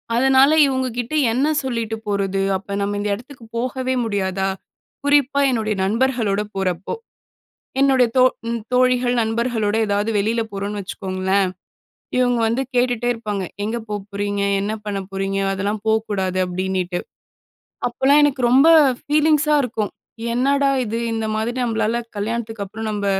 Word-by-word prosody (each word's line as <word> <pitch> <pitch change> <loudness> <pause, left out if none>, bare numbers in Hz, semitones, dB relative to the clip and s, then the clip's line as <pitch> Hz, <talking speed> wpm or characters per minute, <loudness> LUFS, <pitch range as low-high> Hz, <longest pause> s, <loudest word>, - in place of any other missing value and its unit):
அதனால 265 +3 +5 0.2
இவங்க 260 -1 0
கிட்ட, 245 +4 -4 0.2
"என்ன 270 +5 +2 0.2
சொல்லிட்டு 230 -4 -2
போறது? 195 -1 0 0.2
அப்போ 200 +1 -8
நம்ம 205 0 -1
இந்த 205 0 -2
இடத்துக்கு 250 +3 -13
போகவே 255 +2 -1
முடியாதா?" 195 -2 -1 0.6
குறிப்பா, 285 -1 +3
என்னுடைய 215 -3 -1
நண்பர்களோட 225 -2 +1
போறப்போ. 185 -2 -2 0.9
என்னுடைய 265 -3 +4
தோ 255 - +7 0.3
ம் 235 0 -1
தோழிகள், 250 -1 +3
நண்பர்களோட 225 -1 0
ஏதாவது 205 +2 0
வெளியில 220 +3 +1
போறோம்ன்னு 200 +1 -4
வச்சுக்கோங்களேன், 190 0 -1 0.7
இவங்க 245 -1 +2
வந்து, 235 +4 0
கேட்டுட்டே 245 -1 +1
இருப்பாங்க. 210 -4 -4 0.2
"எங்க 225 +3 -2
போ - - -3 0.2
போறீங்க? 205 0 -2 0.2
என்ன 210 +2 -2
பண்ண 200 -1 -2
போறீங்க? 195 0 -2
அதெல்லாம் 205 +2 -2
போக்கூடாது." 205 -4 0
அப்டினிட்டு. 180 0 -2 0.9
அப்போலாம், 270 +4 +3
எனக்கு 280 -2 +1
ரொம்ப 270 +6 +6 0.3
ஃபீலிங்ஸா 300 0 +3
இருக்கும். 220 -4 -3 0.4
"என்னடா 275 +2 +2
இது! 230 +2 -3
இந்த 225 -1 -2
மாதிரி 230 +3 -2
நம்மளால 230 0 0 0.2
கல்யாணத்துக்கு 225 0 -3
அப்புறம் 220 +3 -6
நம்ப 205 -1 -2
225 Hz, 130 wpm, -21 LUFS, 200-255 Hz, 0.9 s, தோ